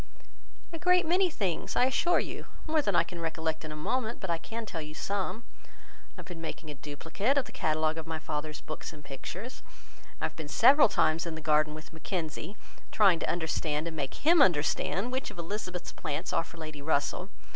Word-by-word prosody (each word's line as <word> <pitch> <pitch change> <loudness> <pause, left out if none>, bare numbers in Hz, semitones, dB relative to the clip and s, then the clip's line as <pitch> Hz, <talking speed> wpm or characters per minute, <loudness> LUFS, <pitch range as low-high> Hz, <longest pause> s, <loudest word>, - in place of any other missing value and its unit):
"A 330 - -4
great 360 +1 +4
many 360 +3 +4
things, 195 - -2
I 250 - +5
assure 345 +7 +3
you. - - -5 0.2
More 315 -1 +2
than 200 -9 0
I - - +6
can 170 0 -8
recollect 160 -1 -2
in 155 - -6
a - - -5
moment; 235 +9 -1
but 190 -3 -2
I 165 - 0
can 225 +6 -5
tell 170 -6 -4
you 155 0 -8
some. 200 +4 -2 0.2
I - - -23
have - - -9
been 175 -3 -8
making 160 -1 -5
a - - -5
duplicate 160 - -1
of 275 - +3
the - - -11
catalogue 155 +1 +1
of 160 - -7
my 160 -1 -2
father's 150 -1 -4
books 155 - -6
and 150 -2 -13
pictures. 180 - -7 0.6
I - - 0
have - - -4
been 160 -2 -6
several 265 - +7
times 160 +2 +2
in 165 - -3
the - - -5
garden 155 0 +3
with 155 +1 -10
Mackenzie, 160 +2 -4 0.3
trying 195 -6 +5
to - - -1
understand, 160 -2 0
and 165 - -4
make 140 -3 -3
him 330 +1 +5
understand, 185 - +3
which 260 +1 -1
of - - -12
Elizabeth's 180 0 -4
plants 145 - -3
are 165 - +3
for 170 - -14
Lady 155 -2 -7
Russell. 150 +5 0
165 Hz, 210 wpm, -30 LUFS, 155-220 Hz, 0.6 s, several